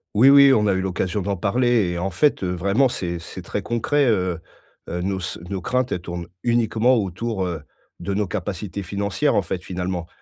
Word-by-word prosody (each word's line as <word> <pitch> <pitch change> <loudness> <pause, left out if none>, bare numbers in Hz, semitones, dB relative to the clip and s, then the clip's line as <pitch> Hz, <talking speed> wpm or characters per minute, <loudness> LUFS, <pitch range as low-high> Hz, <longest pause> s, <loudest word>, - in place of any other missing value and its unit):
Oui, 125 +6 +7
oui, 140 -1 +8
on 105 -4 +3
a 100 - +3
eu 95 - +1
l'occasion 95 +1 -1
d'en 100 +1 -1
parler 115 +2 +2
et 85 - -3
en 90 +3 -1
fait, 120 - +2
heu, 90 -1 -1
vraiment 100 +9 +2
c'est 85 -7 -3
c'est 85 - -9
très - - -4
concret, 135 +5 +1
heu 95 -7 +1 0.5
heu, 90 +1 -3
nos 95 +1 -1
s 90 0 -4
nos 100 - -2
craintes 125 +7 -1
elles 90 - -1
tournent 85 -1 -6 0.2
uniquement 120 +1 +2
autour, 100 0 -2
heu, 85 -4 -4 0.4
de 100 +3 -3
nos 105 +1 0
capacités 100 +1 -4
financières, 100 +8 -1
en - - +4
fait, 90 +1 -4
finalement. 90 -2 -4
100 Hz, 205 wpm, -22 LUFS, 90-115 Hz, 0.5 s, oui